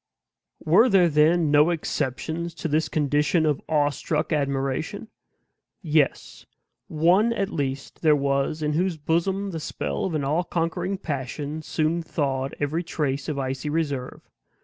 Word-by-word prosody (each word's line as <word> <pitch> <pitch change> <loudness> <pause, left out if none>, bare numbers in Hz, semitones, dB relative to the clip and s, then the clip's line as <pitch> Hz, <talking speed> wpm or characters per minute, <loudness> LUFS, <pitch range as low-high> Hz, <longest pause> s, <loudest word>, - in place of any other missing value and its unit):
Were 190 +11 +5
there, 190 -4 +5
then, 155 +1 +3
no 150 +2 +5
exceptions 160 +1 -3
to 170 - -3
this 155 0 0
condition 150 +2 +1
of 150 -3 +1
awestruck 150 +1 0
admiration? 140 +8 -2 0.7
Yes; 155 -4 0 0.4
one 180 +9 +3
at 200 -2 -2
least 135 -3 -4
there 155 -2 +5
was 140 +2 0
in 150 0 0
whose 175 +1 0
bosom 190 +6 0
the 165 - -4
spell 70 - -3
of 175 - -2
all 155 +6 +1
conquering 170 +3 -2
passion 145 -1 -4
soon 160 +2 -1
thawed 135 -4 -2
every 150 +3 -1
trace 145 -5 -2
of 150 - -3
icy 135 +2 -3
reserve. 145 -5 -3
155 Hz, 135 wpm, -25 LUFS, 140-170 Hz, 0.7 s, Were